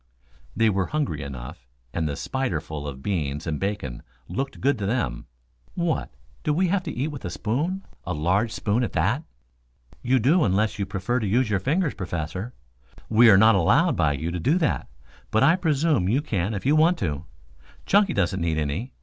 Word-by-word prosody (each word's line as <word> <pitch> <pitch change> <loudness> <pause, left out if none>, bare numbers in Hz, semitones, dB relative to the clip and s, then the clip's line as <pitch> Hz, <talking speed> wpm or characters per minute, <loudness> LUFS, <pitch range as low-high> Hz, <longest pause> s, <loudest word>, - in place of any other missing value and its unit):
They 115 0 +3
were 95 -2 0
hungry 145 - -2
enough, 65 -3 -8 0.3
and 80 -2 -1
the 70 - -3
spiderful 80 - -3
of 70 -1 -7
beans 75 -6 -2
and 75 -4 -2
bacon 95 -12 -3 0.3
looked 135 +11 -4
good 140 -3 +1
to 100 - -2
them. 100 - -2 0.5
"What, 170 -2 -1 0.3
do 150 - 0
we 180 +2 +2
have 195 +1 +1
to - - -3
eat 135 +5 -2
with 145 - -8
a - - -3
spoon 150 - -2 0.2
a 90 - -3
large 95 +9 +1
spoon, 110 +4 0
at - - -3
that?" 105 - +1 0.8
"You 130 +2 +2
do, 150 +9 +3
unless 105 +1 +1
you 100 - -1
prefer 100 +6 -1
to 110 - -2
use 115 +3 +2
your 100 - +2
fingers, 150 - 0
Professor. 90 +4 -4 0.6
We 115 +1 +7
are 95 - +8
not 110 +3 +7
allowed 115 - +3
by 75 -2 +2
you 80 +4 -3
to 90 - -3
do 145 - +2
that, 160 - 0 0.4
but 110 - +2
I 165 - +6
presume 155 - +1
you 135 +7 +1
can 105 - -1
if 100 - -5
you 145 +3 +4
want 165 +3 +4
to. 80 -3 -3 0.6
Chunky 200 -2 +3
doesn't 95 -3 0
need 80 -2 0
any. 80 - -2
105 Hz, 190 wpm, -25 LUFS, 85-140 Hz, 0.8 s, are